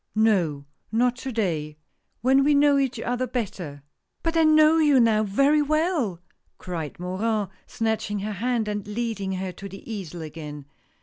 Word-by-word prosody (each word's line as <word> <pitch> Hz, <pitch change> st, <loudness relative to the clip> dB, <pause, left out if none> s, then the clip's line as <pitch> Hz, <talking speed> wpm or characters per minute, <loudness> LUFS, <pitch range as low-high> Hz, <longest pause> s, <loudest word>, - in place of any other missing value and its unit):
"No, 180 Hz, -10 st, +2 dB, 0.3 s
not 245 Hz, +2 st, +2 dB
to 265 Hz, +1 st, -5 dB
day. 160 Hz, -9 st, -2 dB, 0.4 s
When 265 Hz, +2 st, +4 dB
we 290 Hz, +1 st, +4 dB
know 285 Hz, 0 st, +5 dB
each 265 Hz, -4 st, -1 dB
other 245 Hz, +2 st, -1 dB
better." 180 Hz, -, -4 dB, 0.4 s
"But 330 Hz, 0 st, -1 dB
I 325 Hz, -, +5 dB
know 310 Hz, 0 st, +6 dB
you 295 Hz, -4 st, +5 dB
now 225 Hz, -2 st, +4 dB
very 275 Hz, +9 st, +3 dB
well!" 305 Hz, -, 0 dB, 0.4 s
cried 165 Hz, -5 st, -6 dB
Morin, 200 Hz, +3 st, -1 dB, 0.2 s
snatching 220 Hz, -2 st, -1 dB
her 215 Hz, +2 st, -3 dB
hand, 230 Hz, +2 st, -1 dB
and 205 Hz, -1 st, -3 dB
leading 210 Hz, -3 st, -3 dB
her 185 Hz, 0 st, -3 dB
to 195 Hz, +3 st, -9 dB
the 195 Hz, -, -11 dB
easel 175 Hz, -6 st, -6 dB
again. 150 Hz, -2 st, -8 dB
220 Hz, 160 wpm, -25 LUFS, 185-260 Hz, 0.4 s, know